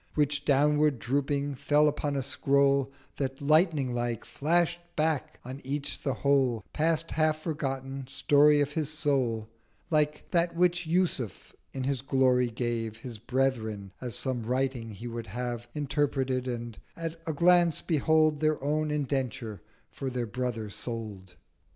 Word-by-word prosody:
Which, 150 -1 +1
downward 150 0 +3
dropping, 140 +4 -1
fell 145 +3 +3
upon 145 -1 -1
a 135 - -1
Scroll 140 0 +2 0.3
That, 135 -1 -2
Lightning 150 -3 +3
like, 120 -2 -2
flash'd 170 +3 +1 0.2
back 155 -2 0
on 130 +3 -7
each 140 +2 -4
the 135 -3 -1
whole 130 -6 +2
Past 160 +1 +1
half 155 -1 +2
forgotten 135 -4 -3
Story 145 +2 +4
of 145 0 0
his 155 -2 -1
Soul: 130 -8 0 0.4
Like 150 -1 +1
that 170 0 +2
which 175 -1 +2
Yusuf 165 - -1 0.2
in 130 - -4
his 135 -1 -1
Glory 130 -2 +3
gave 115 -2 -3
His 115 -1 -8
Brethren 110 -5 -1
as 125 -3 -4
some 130 -3 -2
Writing 125 0 -1
he 110 +4 -9
would 115 -1 -5
have 120 +2 -4
Interpreted; 135 -3 0
and 120 -3 -5 0.2
at 165 0 -5
a 160 - 0
Glance, 170 0 +4
behold 155 -1 +2
Their 155 0 +1
own 155 +2 0
Indenture 130 - -2 0.3
for 135 - -4
their 125 -2 -2
Brother 115 -1 -3
sold! 105 -4 -6
135 Hz, 145 wpm, -29 LUFS, 120-150 Hz, 0.4 s, Story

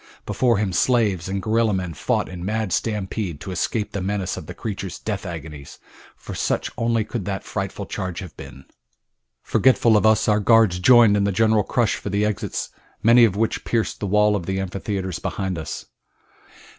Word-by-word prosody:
Before 120 -4 +2
him 100 -2 -1
slaves 100 -4 +1
and 95 0 -3
gorilla 110 -1 +2
men 90 -3 -3
fought 70 - -1
in 90 -2 -8
mad 110 0 -1
stampede 100 -6 -2
to 95 - -6
escape 105 +3 -2
the 100 - -3
menace 95 0 -2
of 75 - -8
the 90 - -8
creature's 100 -4 -5
death 100 -3 -4
agonies, 75 -4 -8 0.4
for - - -9
such - - -1
only 115 -1 +1
could 110 -2 -5
that 95 -1 -3
frightful 100 0 -4
charge 95 -3 -5
have 90 -6 -8
been. 65 - -11 0.8
Forgetful 120 -3 +3
of 105 +1 +4
us, 110 0 +3
our 105 -1 +3
guards 110 -4 +4
joined 115 0 +6
in 100 - +2
the 100 - +1
general 110 +1 +2
rush 120 -3 +3
for - - -6
the 100 +2 +1
exits, 105 -1 -3 0.3
many 115 +1 +7
of 100 -4 0
which 110 +2 -1
pierced 115 -2 -1
the 100 - -3
wall 105 +1 +3
of 90 -4 -4
the 95 0 -1
amphitheater 95 0 -3
behind 95 -2 -3
us. 80 -3 -6
100 Hz, 185 wpm, -22 LUFS, 95-110 Hz, 0.8 s, many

